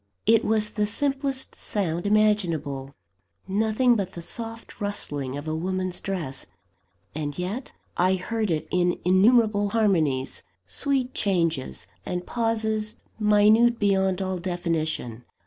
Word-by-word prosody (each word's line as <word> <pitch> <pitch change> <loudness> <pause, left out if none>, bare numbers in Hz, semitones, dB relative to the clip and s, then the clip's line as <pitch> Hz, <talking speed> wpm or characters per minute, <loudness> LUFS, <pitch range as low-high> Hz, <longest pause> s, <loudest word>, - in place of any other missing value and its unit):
It 225 0 +5
was 215 -1 +3
the 210 -1 -1
simplest 275 +3 -1
sound 175 -3 -2
imaginable 170 -11 +1 0.5
nothing 220 +5 +2
but 195 -4 -2
the 170 - -7
soft 225 +3 -3
rustling 145 -9 -3
of 145 +2 -7
a 155 - -1
woman's 185 +2 -2
dress. 160 -9 -4 0.7
And 145 -2 -4
yet, 195 +9 -4 0.2
I 185 +2 +3
heard 215 +3 -2
in 175 +2 +1
it - - -11
innumerable 205 +2 +4
harmonies, 165 -12 +1 0.2
sweet 260 - 0
changes, 165 -9 -1 0.2
and 180 0 -4
pauses 220 -2 0 0.2
minute 215 +3 +5
beyond 190 -2 +1
all 185 -1 -2
definition. 160 -9 -2
195 Hz, 120 wpm, -25 LUFS, 170-220 Hz, 0.7 s, It